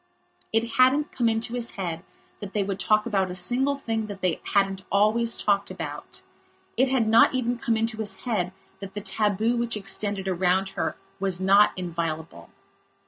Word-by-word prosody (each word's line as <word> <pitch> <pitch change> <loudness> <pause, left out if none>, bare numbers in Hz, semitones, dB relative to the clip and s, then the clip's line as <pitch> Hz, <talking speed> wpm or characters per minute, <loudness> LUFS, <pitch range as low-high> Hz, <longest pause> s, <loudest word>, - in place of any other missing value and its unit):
It 225 +1 +1
hadn't 265 +4 +4
come 235 -3 +1
into 225 +1 -1
his 240 -1 -1
head 170 -4 -4 0.4
that 200 -1 -8
they 205 - +1
would 195 0 -4
talk 215 +1 +2
about 195 -5 0
a 180 - -5
single 255 +10 +1
thing 225 -5 -3
that 200 -2 -8
they 180 -3 0
hadn't 195 -1 +2
always 215 +4 +3
talked 200 -1 +1
about; - - -7 0.5
it 260 - +3
had 255 -4 +1
not 230 +4 +5
even 245 -1 -1
come 230 -2 0
into 225 0 -1
his 220 -2 -3
head 205 -7 -1 0.3
that 195 0 -9
the 205 - -4
tabu 215 +2 0
which 235 -2 -1
extended 200 -1 -2
around 185 +1 +1
her - - -3 0.2
was 190 -2 +1
not 195 +2 +5
inviolable. 165 - -4
210 Hz, 175 wpm, -25 LUFS, 190-230 Hz, 0.5 s, not